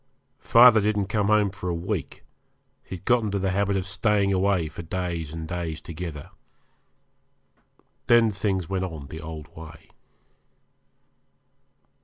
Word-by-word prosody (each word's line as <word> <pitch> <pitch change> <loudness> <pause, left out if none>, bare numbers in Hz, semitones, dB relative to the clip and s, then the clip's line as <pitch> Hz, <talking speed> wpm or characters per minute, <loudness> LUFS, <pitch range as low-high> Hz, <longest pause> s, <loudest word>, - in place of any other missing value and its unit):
Father 115 -2 +6
didn't 100 -1 0
come 105 -1 0
home 105 -2 +3
for 90 -1 -5
a 85 - -1
week 85 -3 -4 0.6
he - - -7
had 90 - -13
got 125 -1 +3
into 100 -2 -2
the 95 -1 -1
habit 100 +1 +1
of 95 - -2
staying 100 +1 +1
away 95 -3 +1
for 75 - -8
days 85 -2 -4
and 80 0 -6
days 85 -2 -4
together. 80 -3 -8 1.8
Then 115 -2 +5
things 95 -3 -2
went 95 -1 -2
on 80 -6 -8
the 80 - -8
old 75 -2 -9
way. 80 -1 -12
95 Hz, 140 wpm, -25 LUFS, 80-100 Hz, 1.8 s, Father